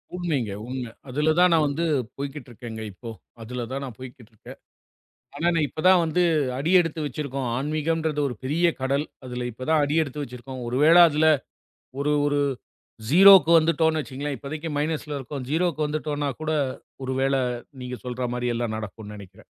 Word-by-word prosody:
உண்மைங்க, 150 - -1 0.2
உண்மை. 125 -3 -5 0.2
அதுல 150 +4 +1
தான் 180 0 +6
நான் 160 -2 +4
வந்து 155 +4 -1 0.3
போய்க்கிட்டு 140 -1 -6
இருக்கேங்க 115 -1 -8
இப்போ. 115 +5 -9 0.3
அதுல 120 +1 -5
தான் 135 +1 -3
நான் 120 -5 -9
போய்க்கிட்டு 125 -3 -11
இருக்கேன். 110 - -13 0.8
ஆனா 165 +4 -1
நான் 160 -2 +2
இப்பதான் 180 +6 +4
வந்து 165 +2 0 0.4
அடி 160 +6 0
எடுத்து 165 -2 -1
வச்சிருக்கோம். 140 -2 -4
ஆன்மீகம்ன்றது 155 +1 -1
ஒரு 125 - -5
பெரிய 155 +7 +1 0.2
கடல். 140 +3 0 0.2
அதுல 125 -1 -4
இப்பதான் 145 +7 0
அடி 145 +2 0
எடுத்து 145 0 -6
வச்சிருக்கோம். 125 0 -8
ஒருவேள 150 +8 +5
அதுல 155 +2 +2 0.7
ஒரு 150 +1 +1
ஒரு 145 0 +1 0.7
0க்கு 190 +1 +8
வந்துட்டோம்னு 160 0 +2
வச்சுக்கோங்களேன். 140 0 -5
இப்போதைக்கு 155 +4 -6
மைனஸ்ல 150 -1 -2 0.3
இருக்கோம்.0க்கு 160 -1 0
வந்துட்டோம்னா 150 -1 -2
கூட 155 0 -2 0.5
ஒருவேள 135 +1 0 0.5
நீங்கச் 125 0 -7
சொல்ற 125 0 -4
மாரி 125 0 -2
எல்லாம் 115 -2 -2
நடக்கும்னு 105 0 -8
நெனைக்கிறேன். 100 -3 -13
145 Hz, 150 wpm, -24 LUFS, 125-155 Hz, 0.8 s, 0க்கு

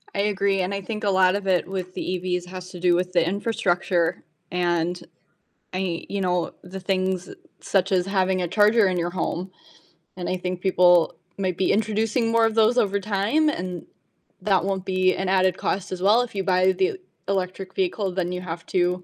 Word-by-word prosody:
I - - -1
agree, 200 -1 +1
and 185 +2 -2
I 200 - -3
think 215 +3 -5
a 205 - +2
lot 185 -1 +4
of 200 -1 -4
it 185 -2 +2
with 185 -1 -5
the - - -5
EVs 180 -1 -2
has 185 0 -8
to 180 - -9
do 175 0 +3
with 180 +1 -1
the 170 -2 +3
infrastructure, 180 -4 0 0.3
and 175 0 0 0.7
I 185 -2 -2
you 200 0 -2
know, 180 -2 0
the 185 +2 -8
things 185 -1 -1 0.3
such 195 -1 0
as 180 -2 +2
having 190 -1 +1
a 175 - -1
charger 210 +3 +4
in 185 -1 0
your 175 0 -1
home. 180 +1 -3 0.7
And 180 - -4
I - - 0
think 180 0 -4
people 180 -3 +4 0.2
might 185 -3 -1
be 190 - +2
introducing 220 +2 +1
more 230 0 +4
of 225 -1 0
those 225 +2 +4
over 200 -4 +2
time, 210 +10 +1
and 180 - -4 0.6
that 190 -3 +2
won't 190 -1 -2
be 185 0 +2
an 190 -1 -2
added 185 -1 +3
cost 190 0 -2
as 185 -1 -4
well, 210 +5 +5
if 245 - -5
you 195 - -1
buy 185 0 +3
the 380 - 0 0.3
electric 190 0 -3
vehicle, 190 +1 -1
then 180 -1 -2
you 180 - -4
have 165 -2 -6
to, 180 0 0
185 Hz, 200 wpm, -24 LUFS, 180-200 Hz, 0.7 s, well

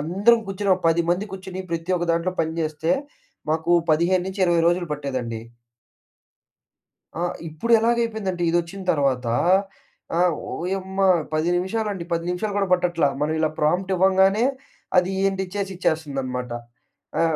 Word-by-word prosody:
అందరం 200 +9 +3
కూర్చొనో 195 -1 +1
10 165 +1 +2
మంది 195 +3 -1
కూర్చొని, 190 0 -7
ప్రతి 170 +2 -1
ఒక్క 175 0 -3
దాంట్లో 170 +2 0
పనిజేస్తే, 160 0 -1 0.6
మాకు 160 +2 -1 0.2
15-20 180 +1 +2
రోజులు 175 0 0
పట్టేదండి. 130 -6 -4 1.8
ఆ! - - -3 0.3
ఇప్పుడు 160 +10 -2
ఎలాగ 235 +2 +2
అయిపోయిందంటే 200 -6 -3
ఇది 170 - +2
వచ్చిన 190 +3 -8
తర్వాత. 135 -5 0 0.9
ఆహ్, 180 -1 +4 0.2
ఓయమ్మా! 190 +2 -1 0.3
10 155 +2 +1
నిమిషాలండి. 195 0 -2
10 170 0 0
నిమిషాలు 200 +3 -2
కూడా 195 -2 0
పట్టట్ల. 175 -3 +2 0.2
మనం 155 +1 +1
ఇలా 155 - +2
ప్రాంప్ట్ 180 +5 +1
ఇవ్వంగానే, 190 +4 +4 0.5
అది 180 +1 +2
ఏంటి 190 -1 0
చేసి 195 -1 -2
ఇచ్చేస్తుందనమాట. 135 -7 -2 0.7
ఆ! - - +4
180 Hz, 130 wpm, -23 LUFS, 160-190 Hz, 1.8 s, ఆహ్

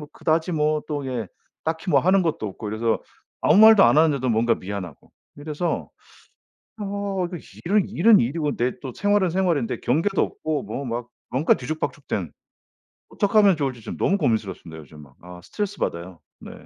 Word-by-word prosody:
뭐 150 - -10
그다지 160 +2 0
뭐 150 0 +1
또 145 -2 -3
이게 125 -5 -3 0.4
딱히 160 +3 -3
뭐 140 - +5
하는 190 +5 +3
것도 160 -10 -2
없고 105 +2 -7
그래서 110 +2 -1 0.4
아무 - - +4
말도 220 -1 +8
안 - - +4
하는데도 145 -5 +3
뭔가 115 +1 +2
미안하고 90 -5 -8 0.3
이래서 150 +3 -3 0.9
어 200 -2 -2
그 175 - -6 0.3
일은 200 +3 +2
일은 210 +4 +5
일이고 145 +4 -1
내 125 +1 0
또 130 -3 -6
생활은 205 -3 +2
생활인데 170 -9 0
경계도 165 +10 +1
없고 155 -3 -2
뭐 140 - -5
막 120 0 -4 0.2
뭔가 135 +5 +3
뒤죽박죽된 135 - -4 0.8
어떡하면 205 -3 +3
좋을지 135 -5 -3
지금 - - -7
너무 195 - +2
고민스럽습니다. 100 - -2
요즘 75 +1 -14
막. 70 -2 -17
아, 90 0 -11
스트레스받아요. 95 - -4 0.2
네. - - -10
150 Hz, 360 characters per minute, -23 LUFS, 115-185 Hz, 0.9 s, 말도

